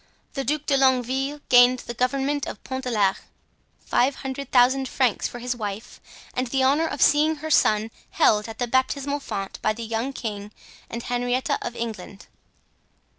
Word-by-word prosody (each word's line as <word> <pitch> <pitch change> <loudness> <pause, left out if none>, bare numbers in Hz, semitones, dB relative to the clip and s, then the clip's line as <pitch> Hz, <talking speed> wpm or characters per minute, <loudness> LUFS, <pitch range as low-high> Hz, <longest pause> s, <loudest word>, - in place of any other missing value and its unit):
The 275 - -3
Duc 300 +3 -1
de 275 - +2
Longueville 265 +2 +1
gained 245 0 +6
the 240 - -5
government 270 +4 -1
of - - -8
Pont 260 0 -5
de - - -1
l'Arche, 200 -5 +2 0.7
five 265 +3 +2
hundred 270 0 -6
thousand 260 +1 +4
francs 255 -5 +1
for - - -9
his 245 +1 -3
wife 215 0 -6 0.3
and 255 0 -1
the 265 +2 0
honor 290 +5 +3
of 290 - 0
seeing 305 +2 +4
her 310 +1 -6
son 215 -4 +3 0.2
held 210 +1 +3
at 225 - -8
the 245 - -1
baptismal 270 +3 0
font 195 -8 -5
by - - +1
the 230 +2 -7
young 230 +4 -2
king 210 -5 -6 0.4
and 235 0 -5
Henrietta 245 +1 -1
of 240 - -5
England. 210 -4 -6
250 Hz, 175 wpm, -24 LUFS, 230-275 Hz, 0.7 s, gained